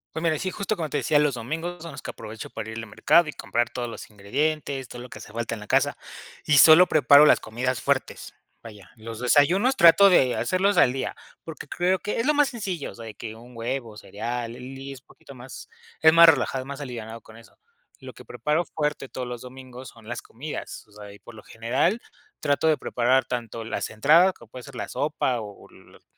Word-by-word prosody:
Pues, 160 Hz, -, -4 dB
mira, 160 Hz, -2 st, +1 dB
sí, 185 Hz, 0 st, -3 dB
justo 205 Hz, +1 st, -3 dB
como 160 Hz, -5 st, -4 dB
te -, -, -2 dB
decía, 145 Hz, +2 st, +2 dB
los 145 Hz, -3 st, +1 dB
domingos 160 Hz, +8 st, -5 dB
son 165 Hz, -3 st, -8 dB
los 140 Hz, -, -9 dB
que -, -, -6 dB
aprovecho 110 Hz, 0 st, -9 dB
para 110 Hz, -, -7 dB
ir 110 Hz, -, -7 dB
al 115 Hz, -, -6 dB
mercado 155 Hz, +9 st, +3 dB
y -, -, -6 dB
comprar 120 Hz, 0 st, -2 dB
todos 120 Hz, -1 st, -5 dB
los 115 Hz, -, -9 dB
ingredientes, 135 Hz, +5 st, -3 dB
todo 120 Hz, -, -9 dB
lo 125 Hz, -, -9 dB
que -, -, -10 dB
hace -, -, -12 dB
falta 115 Hz, 0 st, -4 dB
en 105 Hz, -, -11 dB
la 105 Hz, -, -11 dB
casa, -, -, +1 dB, 0.5 s
y 150 Hz, -, +3 dB
solo 160 Hz, +5 st, +8 dB
preparo 145 Hz, -2 st, +6 dB
las -, -, +5 dB
comidas 125 Hz, +3 st, -3 dB
fuertes. -, -, -2 dB, 0.3 s
Vaya, 105 Hz, -4 st, -13 dB
los 115 Hz, 0 st, -8 dB
desayunos 175 Hz, -, +3 dB
trato 185 Hz, +4 st, +7 dB
de 130 Hz, -8 st, +3 dB
hacerlos 190 Hz, +2 st, +1 dB
al 125 Hz, -, +5 dB
día, 130 Hz, +1 st, -4 dB, 0.3 s
porque 160 Hz, -2 st, -9 dB
creo 180 Hz, +2 st, +1 dB
que 210 Hz, -, -3 dB
es 230 Hz, -, 0 dB
lo 300 Hz, -, +3 dB
más 290 Hz, -2 st, +3 dB
sencillo, 195 Hz, -, -5 dB
o -, -, -14 dB
sea, 115 Hz, -, -10 dB
de 110 Hz, -, -8 dB
que 110 Hz, -2 st, -8 dB
un 120 Hz, +2 st, -15 dB
huevo, 115 Hz, -1 st, -4 dB
cereal, 115 Hz, +3 st, -5 dB
y -, -, -10 dB
l 135 Hz, +1 st, -10 dB
y 140 Hz, -, -7 dB
es 135 Hz, -2 st, -11 dB
poquito 140 Hz, -, -16 dB
más, 130 Hz, 0 st, -11 dB, 0.3 s
es 160 Hz, -, +7 dB
más 165 Hz, +1 st, +8 dB
relajado, 135 Hz, -3 st, +2 dB
es -, -, -14 dB
más 140 Hz, +1 st, -7 dB
alivianado 115 Hz, -3 st, -7 dB
con 110 Hz, +2 st, -16 dB
eso. 115 Hz, -, -18 dB, 0.4 s
Lo -, -, -9 dB
que -, -, -14 dB
preparo 155 Hz, +3 st, -1 dB
fuerte 150 Hz, -3 st, -3 dB
todos 130 Hz, 0 st, -6 dB
los 120 Hz, -1 st, -6 dB
domingos 130 Hz, 0 st, -11 dB
son 115 Hz, -1 st, -16 dB
las 120 Hz, -, -5 dB
comidas, 145 Hz, +7 st, -8 dB
o -, -, -24 dB
sea, 105 Hz, -1 st, -12 dB
y 100 Hz, -, -16 dB
por 120 Hz, -, -14 dB
lo 105 Hz, -, -12 dB
general 130 Hz, -, -1 dB, 0.4 s
trato 145 Hz, +2 st, +1 dB
de 155 Hz, -1 st, +3 dB
preparar 125 Hz, +2 st, +1 dB
tanto 115 Hz, -2 st, -5 dB
las 115 Hz, -, -4 dB
entradas, 160 Hz, -, +4 dB
que 115 Hz, -, -15 dB
puede 125 Hz, +3 st, -11 dB
ser 140 Hz, 0 st, -12 dB
la 120 Hz, -, -5 dB
sopa 140 Hz, -4 st, -1 dB
o 105 Hz, -2 st, -11 dB
las -, -, -20 dB
130 Hz, 230 wpm, -24 LUFS, 115-155 Hz, 0.5 s, solo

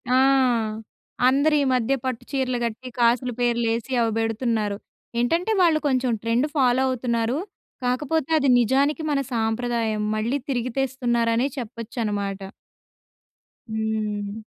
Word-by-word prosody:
ఆ! -, -, +5 dB, 1.1 s
అందరీ 290 Hz, +3 st, +3 dB
మధ్య 250 Hz, +1 st, +1 dB
పట్టు 255 Hz, -3 st, -3 dB
చీరలు 260 Hz, -2 st, 0 dB
గట్టి, 235 Hz, +3 st, -5 dB
కాసుల 240 Hz, +1 st, +3 dB
పేర్లేసి 235 Hz, 0 st, 0 dB
అవి 225 Hz, -1 st, +1 dB
బెడుతున్నారు. 225 Hz, -2 st, -1 dB, 0.4 s
ఏంటంటే 330 Hz, -, +1 dB
వాళ్ళు 325 Hz, -3 st, +4 dB
కొంచెం 255 Hz, -2 st, +1 dB
ట్రెండ్ 235 Hz, +5 st, +1 dB
ఫాలో 260 Hz, -1 st, +3 dB
అవుతున్నారు. 240 Hz, 0 st, -1 dB, 0.5 s
కాకపోతే, 285 Hz, +4 st, 0 dB
అది 275 Hz, -2 st, +2 dB
నిజానికి 275 Hz, +6 st, +2 dB
మన 280 Hz, -, +2 dB
సాంప్రదాయం, 225 Hz, -1 st, -1 dB
మళ్ళీ 230 Hz, +6 st, 0 dB
తిరిగి 245 Hz, -1 st, -1 dB
తెస్తున్నారనే 240 Hz, -2 st, +1 dB
చెప్పొచ్చనమాట. 215 Hz, -4 st, -3 dB, 1.3 s
హ్మ్. 215 Hz, -1 st, -2 dB
240 Hz, 105 wpm, -24 LUFS, 225-265 Hz, 1.3 s, ఆ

